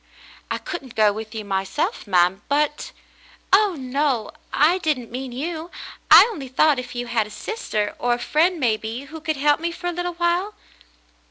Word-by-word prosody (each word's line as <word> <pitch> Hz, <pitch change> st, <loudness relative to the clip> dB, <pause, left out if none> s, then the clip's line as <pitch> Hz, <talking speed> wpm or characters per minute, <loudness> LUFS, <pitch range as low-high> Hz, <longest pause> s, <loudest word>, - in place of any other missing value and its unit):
"I -, -, -1 dB
couldn't 275 Hz, -9 st, -7 dB
go 215 Hz, -2 st, +4 dB
with 220 Hz, +1 st, -7 dB
you 215 Hz, -1 st, -5 dB
myself, 200 Hz, -, -2 dB
ma'm 180 Hz, +1 st, +3 dB
— -, -, -37 dB
but 295 Hz, +1 st, 0 dB, 0.2 s
— -, -, -27 dB
" -, -, -20 dB
"Oh, 400 Hz, -2 st, +5 dB
no! 260 Hz, -3 st, -1 dB, 0.2 s
I 330 Hz, +6 st, +3 dB
didn't 295 Hz, -9 st, -2 dB
mean 255 Hz, +1 st, -5 dB
you. 320 Hz, +6 st, -4 dB, 0.4 s
I -, -, +10 dB
only 285 Hz, -11 st, -7 dB
thought 275 Hz, +2 st, +3 dB
if 250 Hz, 0 st, -8 dB
you 245 Hz, 0 st, -3 dB
had 230 Hz, -3 st, 0 dB
a -, -, -13 dB
sister 215 Hz, -, -3 dB
— -, -, -32 dB
or 245 Hz, 0 st, +1 dB
a -, -, 0 dB
friend, 330 Hz, +7 st, +1 dB
maybe, 225 Hz, -1 st, -1 dB
who 310 Hz, +3 st, -10 dB
could 315 Hz, -1 st, -2 dB
help 290 Hz, +2 st, +3 dB
me 340 Hz, +1 st, -2 dB
for 350 Hz, +1 st, -10 dB
a 350 Hz, -, +1 dB
little 355 Hz, +1 st, -3 dB
while." 350 Hz, +4 st, 0 dB
280 Hz, 200 wpm, -22 LUFS, 230-335 Hz, 0.4 s, I